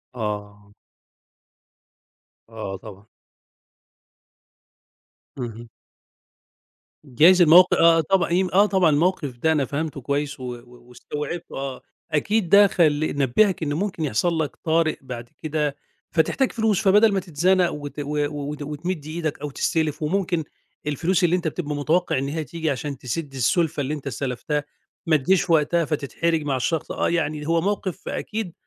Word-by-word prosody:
آه. 105 Hz, -2 st, -5 dB, 1.8 s
آه 110 Hz, -4 st, -6 dB
طبعًا. 100 Hz, 0 st, -12 dB, 2.3 s
اهم. 120 Hz, -2 st, -7 dB, 1.4 s
جايز 165 Hz, +8 st, +5 dB
الموق 175 Hz, +3 st, +7 dB
آه 165 Hz, 0 st, +5 dB
طبعًا، 185 Hz, +2 st, +1 dB
يمك 185 Hz, 0 st, +1 dB
آه 200 Hz, +2 st, +6 dB
طبعًا 190 Hz, -5 st, +3 dB
الموقف 150 Hz, -4 st, 0 dB
ده 160 Hz, +6 st, +2 dB
أنا 145 Hz, -4 st, +1 dB
فهمته 145 Hz, 0 st, -4 dB
كويس، 140 Hz, +2 st, -2 dB
و 130 Hz, -, -8 dB
و 120 Hz, 0 st, -17 dB
واستوعبته 150 Hz, +7 st, -6 dB
آه. 135 Hz, -1 st, -5 dB, 0.3 s
أكيد 190 Hz, +4 st, +1 dB
ده 200 Hz, 0 st, +7 dB
خل 155 Hz, -5 st, +1 dB
نبهك 160 Hz, -, +2 dB
إن 145 Hz, -1 st, -1 dB
ممكن 180 Hz, 0 st, -2 dB
يحصل 160 Hz, +5 st, 0 dB
لك 150 Hz, -3 st, -2 dB
طارئ 160 Hz, -1 st, +1 dB
بعد 120 Hz, -3 st, -8 dB
كده، 150 Hz, -2 st, -1 dB, 0.4 s
فتحتاج 250 Hz, +11 st, +1 dB
فلوس، 220 Hz, -4 st, +1 dB
فبدل 210 Hz, +2 st, +5 dB
ما 195 Hz, -, +2 dB
تتزنق 180 Hz, +2 st, +2 dB
وت 145 Hz, 0 st, -7 dB
و 145 Hz, 0 st, -1 dB
وت 145 Hz, 0 st, -5 dB
وتمد 150 Hz, +2 st, -4 dB
إيدك 155 Hz, -2 st, -4 dB
أو 150 Hz, -, -3 dB
تستلف، 155 Hz, +2 st, -1 dB
وممكن 175 Hz, 0 st, 0 dB, 0.4 s
الفلوس 175 Hz, +5 st, 0 dB
اللي 175 Hz, 0 st, +4 dB
أنت 180 Hz, -2 st, -2 dB
بتبقى 150 Hz, -2 st, -3 dB
متوقع 155 Hz, +3 st, +1 dB
إن 135 Hz, +1 st, -1 dB
هي 155 Hz, +1 st, -3 dB
تيجي 160 Hz, +3 st, -3 dB
عشان 140 Hz, +1 st, -4 dB
تسد 135 Hz, +3 st, -5 dB
السُلفة 145 Hz, +4 st, +1 dB
اللي 140 Hz, +3 st, -2 dB
أنت 145 Hz, -2 st, -6 dB
استلفتها، 140 Hz, +3 st, -2 dB, 0.4 s
ما 160 Hz, -1 st, +3 dB
تيجيش 180 Hz, +5 st, +1 dB
وقتها 165 Hz, +1 st, +3 dB
فتتحرج 160 Hz, +2 st, -1 dB
مع 140 Hz, -2 st, -1 dB
الشخص. 155 Hz, +5 st, -2 dB
آه -, -, 0 dB
يعني 155 Hz, -3 st, -1 dB
هو 165 Hz, 0 st, +2 dB
موقف 200 Hz, -1 st, -3 dB
أكيد 210 Hz, -5 st, -4 dB
155 Hz, 145 wpm, -23 LUFS, 140-175 Hz, 2.3 s, الموق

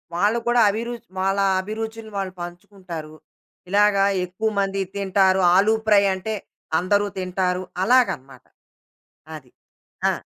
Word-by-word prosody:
వాళ్ళ 205 Hz, +5 st, +2 dB
కూడా 240 Hz, 0 st, +3 dB
అభిరుచి 235 Hz, +2 st, -4 dB
వాళ్ళ 195 Hz, +1 st, +1 dB, 0.2 s
అభిరుచిని 220 Hz, +2 st, -6 dB
వాళ్ళు 190 Hz, -2 st, -3 dB
పంచుకుంటారు. 175 Hz, -3 st, -8 dB, 0.5 s
ఇలాగ 205 Hz, +1 st, +4 dB, 0.3 s
ఎక్కువ 185 Hz, +5 st, -2 dB
మంది 195 Hz, 0 st, 0 dB
తింటారు. 190 Hz, -1 st, +2 dB
ఆలు 205 Hz, +4 st, +4 dB
ఫ్రై 205 Hz, -2 st, +5 dB
అంటే 190 Hz, +4 st, -4 dB, 0.5 s
అందరూ 200 Hz, +3 st, +1 dB
తింటారు. 185 Hz, 0 st, -1 dB, 0.2 s
అలాగనమాట. 150 Hz, -, +1 dB, 0.9 s
అది. 130 Hz, -5 st, -13 dB, 0.6 s
ఆ! -, -, -1 dB
195 Hz, 110 wpm, -22 LUFS, 185-215 Hz, 0.9 s, ఫ్రై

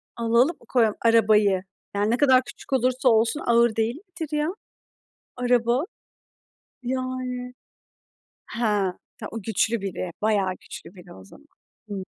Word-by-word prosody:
Alalım, 235 Hz, +7 st, +2 dB
koyalım 225 Hz, -4 st, +3 dB
arabayı? 210 Hz, -4 st, +4 dB, 0.3 s
Yani 205 Hz, +2 st, +1 dB
ne 240 Hz, -, +2 dB
kadar 260 Hz, -2 st, +5 dB
küçük 270 Hz, -, -9 dB
olursa 255 Hz, 0 st, +2 dB
olsun, 225 Hz, +4 st, +3 dB
ağır 235 Hz, -1 st, +4 dB
değil 225 Hz, +2 st, 0 dB
midir 330 Hz, -3 st, -6 dB
ya, 300 Hz, +2 st, 0 dB, 0.9 s
araba? 245 Hz, +1 st, +2 dB, 1.0 s
Yani. 255 Hz, 0 st, -3 dB, 0.9 s
He -, -, -8 dB, 0.6 s
ta 220 Hz, -5 st, -6 dB
o 225 Hz, -, -5 dB
güçlü 220 Hz, +2 st, 0 dB
biri. 185 Hz, -2 st, -4 dB
Bayağı 205 Hz, -3 st, +2 dB
güçlü 180 Hz, -, -11 dB
biri 180 Hz, -1 st, -13 dB
o 95 Hz, -, -13 dB
zaman. 95 Hz, -, -17 dB, 0.4 s
Hımm. 195 Hz, -2 st, -4 dB
235 Hz, 130 wpm, -24 LUFS, 215-255 Hz, 1.0 s, kadar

